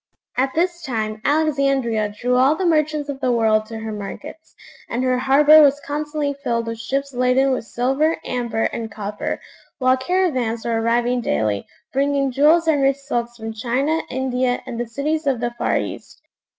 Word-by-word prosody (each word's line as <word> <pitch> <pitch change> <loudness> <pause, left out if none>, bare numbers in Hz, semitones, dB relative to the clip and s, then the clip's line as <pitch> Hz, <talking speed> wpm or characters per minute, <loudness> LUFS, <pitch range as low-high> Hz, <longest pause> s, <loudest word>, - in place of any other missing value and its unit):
At 265 +1 0
this 345 +1 0
time 220 -6 -3
Alexandria 275 -8 +1
drew 250 +1 +1
all 265 +4 +4
the 370 - -2
merchants 305 -3 +1
of 280 -2 -5
the 255 -2 +1
world 220 -2 +2
to 225 - -7
her 220 0 -5
markets; 280 +10 -8 0.3
and 240 +2 -1
her 255 -1 +1
harbour 290 +4 +6
was 285 -1 +4
constantly 295 0 -3
filled 240 -5 -2
with 230 -1 -5
ships 275 +4 -3
laden 255 +2 +2
with 255 - -2
silver, 270 +7 0
amber, 235 -2 -2
and 225 -2 -3
copper; 205 0 -4 0.4
while 255 -1 +3
caravans 260 -8 0
were 230 -1 0
arriving 240 +2 +1
daily, 105 - -1 0.3
bringing 275 0 +1
jewels 310 +5 +4
and 300 -3 +3
rich 270 0 +3
silks 240 -4 -3
from 225 -1 -6
China, 260 +8 0
India, 255 -1 -1
and 245 -3 -6
the 240 - -2
cities 300 +6 -2
of 265 -4 +1
the 240 0 -1
far 240 - 0
East. - - -6
260 Hz, 175 wpm, -21 LUFS, 235-285 Hz, 0.4 s, harbour